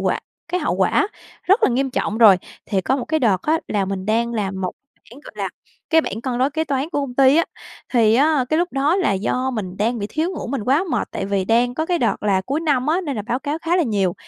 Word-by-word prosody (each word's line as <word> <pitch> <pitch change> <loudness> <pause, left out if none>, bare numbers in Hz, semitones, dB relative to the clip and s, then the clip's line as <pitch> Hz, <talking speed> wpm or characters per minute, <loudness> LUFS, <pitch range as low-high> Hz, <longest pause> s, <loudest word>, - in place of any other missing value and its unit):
quả - - 0 0.3
cái 360 +2 -1
hậu - - 0
quả 410 - +2 0.3
rất 390 +6 +3
là - - +5
nghiêm 265 +2 0
trọng 220 -3 -2
rồi. 215 -5 +8 0.3
Thì 195 -3 0
có 260 +8 0
một 255 - -3
cái 315 0 -1
đợt 205 -7 +2
á 315 +2 +2
là 205 -2 0
mình 190 0 -4
đang 235 +2 +1
làm 195 -3 -2
một 185 -1 -2 0.4
bảng, 255 +5 -13
gọi - - -12
là, - - -3 0.4
cái 320 0 +6
bảng 220 -8 -5
cân 245 0 -3
đối 260 +3 +2
kế 320 +2 -1
toán 280 0 -1
của 290 - -1
công 270 -3 -5
ty 270 +2 +5
á. 335 - +4 0.5
Thì 225 -3 +4
á, 285 +1 +3
cái 310 - +1
lúc 350 +1 -1
đó 280 +6 +2
là 365 - +1
do 250 +7 -1
mình 195 -7 -5
đang 230 +4 0
bị 205 - -3
thiếu 315 - -2
ngủ - - -5
mình 265 +1 -3
quá 280 - +2
mệt, - - -1
tại 195 - -4
vì 200 -1 0
đang 240 +4 +2
có 315 +4 -2
cái 350 0 +1
đợt 235 - 0
là 200 -2 +2
cuối 275 +10 -2
năm 285 -5 +1
á, 325 +4 +2
nên 290 -8 -4
là 210 - -3
báo 240 +4 -2
cáo 290 +3 -3
khá 335 +2 +1
là 360 - +3
nhiều. 200 - 0
255 Hz, 275 wpm, -21 LUFS, 210-310 Hz, 0.5 s, rồi